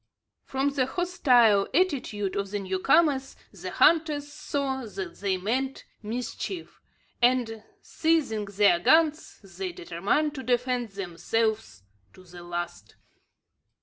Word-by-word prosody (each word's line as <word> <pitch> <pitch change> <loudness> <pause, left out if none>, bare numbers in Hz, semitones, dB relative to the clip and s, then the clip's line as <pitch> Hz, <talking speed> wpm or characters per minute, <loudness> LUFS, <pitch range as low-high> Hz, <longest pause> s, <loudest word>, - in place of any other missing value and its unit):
From 270 +1 0
the 265 -2 0
hostile 255 - +3
attitude 255 - 0
of 200 0 -2
the 205 - -2
new 190 -1 -3
comers 275 - +3 0.2
the - - -7
hunters 300 -3 +2
saw 275 -3 -3
that 195 -5 -7
they 195 -2 0
meant 255 +8 -2 0.2
mischief; 250 - -5 0.4
and, 240 -3 +2 0.2
seizing 300 -10 0
their 200 -3 +3
guns, 315 - +2
they 190 -1 -6
determined 195 - -1
to 275 - -6
defend 250 -1 0
themselves 195 - -2 0.3
to 185 - -16
the 175 -1 -12
last. 175 0 -6
235 Hz, 115 wpm, -27 LUFS, 195-280 Hz, 0.4 s, hostile